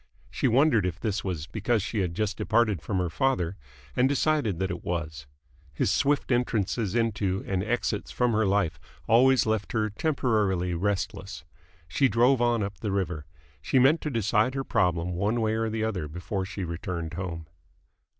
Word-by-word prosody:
She - - 0
wondered 125 -3 +4
if 90 0 -3
this 105 -3 -2
was 90 -6 -3
because 110 +5 -1
she 110 +1 -2
had 90 -3 -1
just 105 -1 -1
departed 110 -4 +1
from 100 - -2
her 90 -2 -1
father, 95 -7 0 0.4
and 130 +2 +3
decided 145 - +1
that 95 +2 -1
it 85 - -6
was. 80 -5 -4 0.5
His - - +1
swift 140 -1 +1
entrances 115 -4 0
into 100 -5 0
and 95 -1 -1
exits 120 +3 -1
from 125 -1 +1
her 110 -1 +2
life 95 -4 +1 0.3
always 125 +2 +5
left 110 -2 -1
her 110 -2 0
temporarily 105 - 0
restless. 95 -1 -3 0.4
She 90 - +2
drove 120 +2 +3
on 120 -2 +2
up 100 0 -5
the 105 - -2
river. 90 -6 -2 0.3
She 130 - 0
meant 135 +6 +5
to 150 - -2
decide 115 +1 +1
her 135 - -1
problem 90 -6 +1
one 100 +7 0
way 110 -1 +1
or 110 0 0
the 110 0 -2
other 95 -8 -2
before 90 +5 -4
she 100 -1 -5
returned 85 -1 -4
home. 85 -3 -5
105 Hz, 175 wpm, -27 LUFS, 90-120 Hz, 0.5 s, always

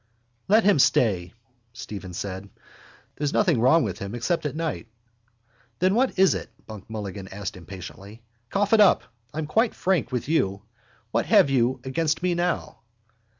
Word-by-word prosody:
—Let 215 +3 +5
him 200 -7 +4
stay, 95 -9 +2 0.4
Stephen 100 -6 -8
said. 95 +2 -5 0.7
There's 145 -1 -1
nothing 170 - +2
wrong 135 +7 +5
with 100 -5 -4
him 100 +3 -5
except 150 +6 -1
at 145 - -6
night. 165 -6 -3 0.9
—Then 185 +2 +2
what 255 +4 +1
is 190 0 +5
it? - - -5 0.2
Buck 110 -2 -11
Mulligan 100 -3 -6
asked 100 0 -6
impatiently. 95 +5 -10 0.3
Cough 205 +2 0
it 225 - +6
up. 200 - +5 0.3
I'm 155 +1 -3
quite 220 +10 +1
frank 175 -9 0
with 125 -1 -2
you. 100 -11 0 0.5
What - - 0
have 140 - +5
you 130 0 +1
against 155 +5 -1
me 180 -1 +2
now? 175 0 -2
130 Hz, 155 wpm, -25 LUFS, -, 0.9 s, it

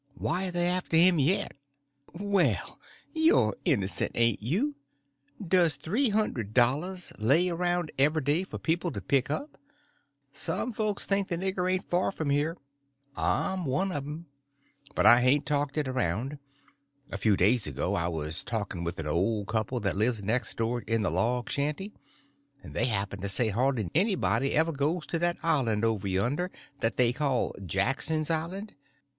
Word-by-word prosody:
"Why, 190 +1 -1
are - - -4
they 175 0 0
after 180 -2 +1
him 175 0 +6
yet?" 155 +8 +2 0.6
"Well, 200 0 0 0.3
you're 315 - +3
innocent, 95 -1 0
ain't 115 -3 +2
you! 200 - 0 0.7
Does 170 -4 +4
three 210 - 0
hundred 130 - -1
dollars 150 +10 +1
lay 145 +12 +4
around 175 -1 -1
every 150 +2 +3
day 150 +6 +1
for 190 - -7
people 170 +1 -1
to - - -4
pick 135 -2 +1
up? 280 - -4 0.7
Some 245 - -2
folks 210 -1 -1
think 195 -1 +2
the 170 - -1
nigger 185 0 -1
ain't 185 0 -1
far 180 +2 +1
from 155 -6 -2
here. 150 +4 0 0.6
I'm 190 -1 0
one 155 +7 0
of 145 -4 -3
them—but 140 - -7
I 120 +3 +8
hain't 140 +3 +3
talked 145 0 -1
it 150 -3 +1
around. 130 - -2 0.7
A - - -3
few 105 -1 +3
days 105 +3 +3
ago 95 - -2
I 85 -4 0
was 80 0 -3
talking 105 -7 -4
with 85 +1 -4
an 80 - -4
old 100 +7 0
couple 110 +3 -1
that 100 -2 -1
lives 110 +1 0
next 115 +5 -1
door 115 +2 -1
in 115 -1 -1
the 95 - 0
log 120 +8 0
shanty, 150 +9 -2 0.7
and - - -10
they - - +1
happened 100 -4 -2
to 100 - -2
say 110 +3 +1
hardly 115 -2 0
anybody 180 -6 +1
ever 160 +2 +3
goes 150 +3 -1
to 165 - -2
that 175 +1 0
island 115 -9 +1
over 110 -3 0
yonder 120 - 0 0.3
that 115 0 -1
they 120 -1 +4
call 135 -2 0
Jackson's 145 - 0
Island. 180 +6 -3
140 Hz, 165 wpm, -28 LUFS, 115-175 Hz, 0.7 s, I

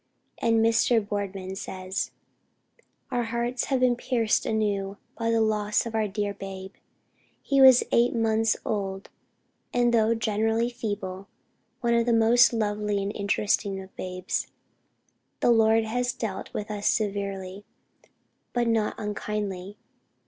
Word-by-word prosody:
And 225 -1 +3
Mr. 230 +1 +3
Boardman 195 -2 -4
says: 190 0 -4 1.0
"Our 245 -2 0
hearts 235 +2 -2
have 265 -2 0
been 250 -1 +4
pierced 235 -3 0
anew 205 -2 -1 0.2
by 230 -1 -2
the 230 0 +2
loss 210 -1 +1
of 230 - -5
our 220 -1 +1
dear 205 0 -2
babe.... 190 -1 -8 0.7
He 275 -1 +2
was 260 -2 +8
8 240 +1 +3
months 225 -1 +2
old, 195 -2 -3 0.6
and 240 -1 +2
though 225 0 +3
generally 225 +2 0
feeble, 200 -4 -5 0.5
one 235 -1 +2
of 235 0 +2
the 235 - +3
most 230 +2 +5
lovely 210 -2 -1
and 200 +1 -4
interesting 200 -1 0
of 190 0 -12
babes. 185 0 -3 0.9
The - - +4
Lord 225 0 +4
has 245 +3 -1
dealt 210 -5 -5
with 210 +1 -5
us 205 -1 -2
severely, 200 -2 -2 0.9
but 240 -1 +1
not 225 -2 +1
unkindly. 205 -2 -4
215 Hz, 135 wpm, -26 LUFS, 200-230 Hz, 1.0 s, was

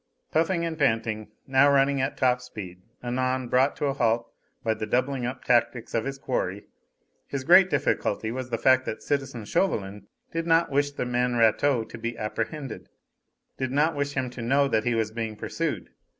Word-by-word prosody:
Puffing 170 +2 +1
and 165 -1 -4
panting, 110 -5 0 0.2
now 135 +1 +4
running 140 0 +3
at 130 - -2
top 125 -1 +2
speed, 95 -8 -9 0.2
anon 130 +1 -1
brought 130 +3 +3
to - - -2
a 140 - +1
halt 115 -3 0 0.3
by 110 - +1
the 110 - -5
doubling 125 +2 0
up 130 +1 -6
tactics 120 -1 +1
of 115 -1 0
his 135 0 -4
quarry, 105 -7 -3 0.6
his 140 -2 -4
great 180 +5 +7
difficulty 120 - 0
was 130 +1 -5
the 115 - -1
fact 130 +1 +4
that - - -4
citizen 135 -6 -2
Chauvelin 100 - -1 0.2
did 165 0 -3
not 165 -1 +3
wish 145 +1 +2
the 145 - -4
man 125 0 0
Rateau 115 +2 +3
to 110 - -10
be 115 0 -4
apprehended; 115 +5 -4 0.7
did 130 - -1
not 150 +4 +2
wish 145 0 -2
him 130 -2 -2
to 125 - -8
know 140 +4 +3
that 110 -4 0
he 120 -1 +1
was 110 -1 0
being 110 -1 -4
pursued. - - -3
125 Hz, 185 wpm, -26 LUFS, 115-140 Hz, 0.7 s, great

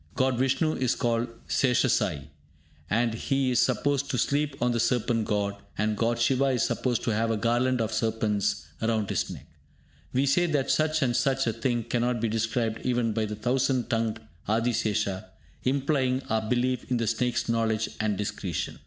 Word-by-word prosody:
God 130 -2 +1
Vishnu 135 +4 +2
is 130 -1 0
called 120 0 0 0.2
Seshasayee, 110 - +1 0.6
as 115 +1 +1
he 135 -1 +1
is 125 - +2
supposed 140 +3 +1
to 125 - -1
sleep 140 +3 0
on 120 +1 +2
the 120 - 0
Serpent 115 -1 +1
God; 100 -2 -1 0.2
and 105 +1 0
God 115 +2 0
Siva 130 +3 +2
is 130 -3 +1
supposed 125 -2 0
to 115 - 0
have 115 +2 +1
a 115 - +1
garland 120 +3 +1
of 110 -1 -1
serpents 105 -6 0 0.2
round 110 -2 0
his - - -1
neck! - - -8 0.7
We 130 +2 +2
say 155 +6 +3
that 145 -5 +1
such 155 -1 +2
and 120 -2 +1
such 135 +2 +1
a 115 - 0
thing 120 0 -1
cannot 120 +1 0
be 115 0 0
described 115 0 -1
even 120 -3 +1
by 110 0 0
the 105 0 -4
thousand 125 +2 0
tongued 115 -1 0 0.3
Adisesha, 110 -3 0 0.4
implying 135 -1 +1
our 110 -1 0
belief 125 0 0
in 125 - +1
the 115 - 0
snake's 120 +2 0
knowledge 115 -1 +1
and 105 -2 0
discretion. 100 -3 -3
120 Hz, 175 wpm, -27 LUFS, 110-130 Hz, 0.7 s, say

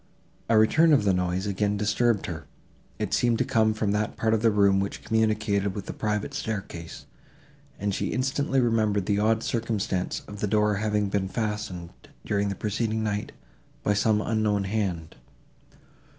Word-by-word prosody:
A 115 - +5
return 155 +9 +5
of 140 - +4
the 100 -2 +3
noise 90 +1 -1
again 105 +1 0
disturbed 105 +1 +1
her; 80 -5 -6 0.5
it - - -3
seemed 120 -2 +2
to - - +1
come 110 -1 +2
from 105 -2 0
that 105 +1 -1
part 110 0 +1
of 110 - +1
the 115 - +4
room, 100 -2 +4
which 100 0 -3
communicated 110 -3 +1
with 100 -2 -5
the - - -5
private 105 +4 -2
staircase, 100 - -5 0.7
and 100 0 -2
she - - -1
instantly 135 +1 0
remembered 110 -5 +1
the 100 +1 +1
odd 110 +1 +2
circumstance 110 -5 -2
of 105 0 -9
the 105 - 0
door 105 0 +2
having 105 -1 0
been 95 -1 0
fastened, 105 -5 -4 0.3
during 100 0 0
the 100 - -3
preceding 110 +1 -1
night, 105 -1 -2 0.5
by 105 - +2
some 105 +1 +2
unknown 105 -3 +1
hand. 95 -5 -3
105 Hz, 165 wpm, -26 LUFS, 100-110 Hz, 0.7 s, A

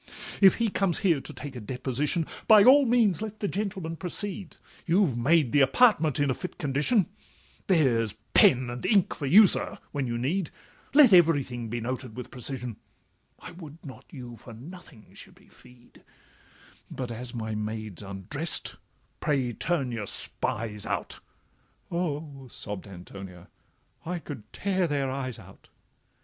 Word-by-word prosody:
'If 195 -1 +8
he 230 -1 0
comes 195 -3 0
here 165 -7 +3
to - - -7
take 140 -3 -8
a - - -5
deposition, 130 - -1 0.2
By 215 -3 +8
all 270 +3 +7
means 225 -6 +3
let 215 -1 -6
the 205 - -1
gentleman 190 -5 -3
proceed; 190 +1 -6 0.3
You've 175 - +3
made 140 +2 +3
the 145 - +4
apartment 155 - +4
in 145 -2 +2
a - - +2
fit 180 - -7
condition: 150 - +1 0.6
There's 125 - +2 0.2
pen 125 -1 +5
and 120 0 -7
ink 200 -5 +3
for 145 - -4
you, 205 +9 +9
sir, - - -1
when 140 -3 -2
you 120 0 -2
need— 160 +9 -1 0.5
Let 280 -8 +8
every 165 -5 +6
thing 120 -2 -6
be 120 +2 -3
noted 125 0 -5
with 125 - -7
precision, 125 -2 -6 0.6
I - - -10
would 165 -4 -11
not 135 - -10
you 125 -4 -9
for 115 +2 -12
nothing 140 -1 -13
should - - -10
be - - -22
fee'd— 125 -1 -19 0.9
But, 125 -2 -5
as 120 +1 -6
my 110 -1 -3
maid 105 -2 -4
's - - -4
undrest, 100 - -2 0.4
pray 135 -5 0
turn 140 0 -1
your 110 -4 -4
spies 105 +1 -2
out.' - - -3 0.7
'Oh!' 150 -5 -3
sobb'd 105 -3 -6
Antonia, 90 -1 -11 0.5
'I 175 +2 -3
could 140 -10 -9
tear 190 -2 0
their 140 -3 -1
eyes 130 -3 -4
out. - - -16
140 Hz, 160 wpm, -27 LUFS, 120-180 Hz, 0.9 s, you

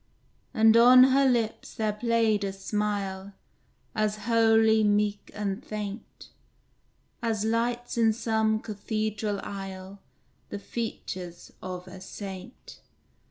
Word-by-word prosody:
And 220 0 +5
on 250 +2 +8
her 275 0 +4
lips 230 -3 -1
there 215 -1 -1
played 225 -1 +1
a 195 - -1
smile 200 -1 -3 0.6
As 215 -1 -1
holy, 225 -1 +4
meek, 205 0 +1
and 205 +2 -3
faint, 210 0 -7 0.9
As 220 -3 -1
lights 235 +2 -1
in 225 -1 +5
some 220 -1 0
cathedral 215 -1 -3
aisle 195 0 -7 0.5
The - - -5
features 185 -5 -6
of 180 0 -6
a 185 0 -11
saint. 195 +4 -9
215 Hz, 110 wpm, -27 LUFS, 200-225 Hz, 0.9 s, on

